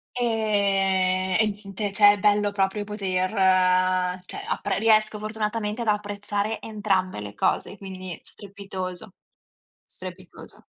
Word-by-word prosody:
e 195 -5 +1
e 220 - +4
niente, 205 0 -4
cioè 205 0 +7
è 205 - -4
bello 205 0 +3
proprio 195 +1 0
poter 190 -3 -1 1.0
cioè, - - -6
appre - - -1
riesco 215 -1 +3
fortunatamente 215 +1 -3
ad 230 - -3
apprezzare 205 +1 -1
entrambe 200 - -1
le 105 0 -8
cose, 205 - 0
quindi 185 -3 -7
strepitoso, 190 -2 -7 0.7
strepitoso. - - -10
205 Hz, 110 wpm, -25 LUFS, 190-210 Hz, 1.0 s, cioè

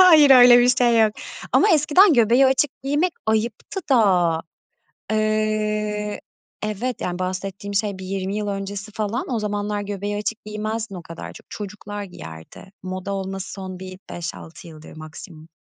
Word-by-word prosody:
Hayır, 315 -6 +8
öyle 245 -2 +9
bir 245 0 +4
şey 235 -2 +4
yok 215 -1 +4 0.4
ama 425 - +5
eskiden 320 +4 +5
göbeği 240 +3 +5
açık 265 +2 +2
giymek 300 +6 +1
ayıptı 220 - -1
da! 180 -9 +3 0.7
Eee. 215 -1 -1 0.4
Evet, 215 +4 -3
yani 180 0 -3
bahsettiğim 190 +2 -4
şey 200 -2 -1
bir 190 - -7
20 195 +1 -3
yıl 210 - -3
öncesi 200 +1 -5
falan. 220 +5 -3
O 230 - 0
zamanlar 205 0 -2
göbeği 205 0 -4
açık 210 +1 -4
giymezdin 215 0 -4
o 175 - -7
kadar 165 0 -9
çok. - - -14
Çocuklar 205 0 -7
giyerdi. 80 - -11
Moda 185 +1 -4
olması 195 -1 -5
son 185 -2 -7
bir 185 0 -9
5-6 170 0 -8
yıldır 155 -1 -12
maksimum. 155 +1 -11
210 Hz, 150 wpm, -22 LUFS, 190-225 Hz, 0.7 s, öyle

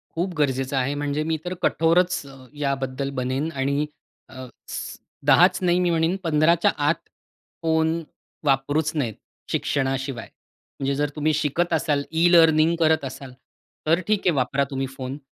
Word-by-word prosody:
खूप 180 +2 -1
गरजेचं 135 -2 0
आहे. 135 +2 0
म्हणजे 145 +1 -1
मी 160 0 -1
तर 180 - -2
कठोरच 175 +3 +2
अ, 135 - -12 0.2
याबद्दल 135 -2 -2
बनेन 135 +5 -2
आणि 140 0 0 0.4
अ, 130 0 -9 0.8
10च - - +6
नाही, 180 -1 +2
मी 180 -1 +2
म्हणेन 165 +1 +1
15च्या 165 +1 +3 0.2
आत 170 - +3 0.7
फोन 160 0 +1 0.4
वापरूच 145 +3 +1
नयेत, 125 -7 -1 0.4
शिक्षणाशिवाय. 135 -3 -1 0.5
म्हणजे 140 0 0
जर 145 +1 0
तुम्ही 155 +1 +1
शिकत 160 +3 0
असाल 150 -3 +1
ई-लर्निंग 165 -1 +5
करत 160 -2 +3
असाल, 135 0 -8 0.6
तर 165 +2 +4
ठीक 210 -1 +2
आहे, 180 - +5
वापरा 135 +1 +1
तुम्ही 135 -1 -2
फोन. 130 +1 -6
150 Hz, 140 wpm, -23 LUFS, 135-165 Hz, 0.8 s, 10च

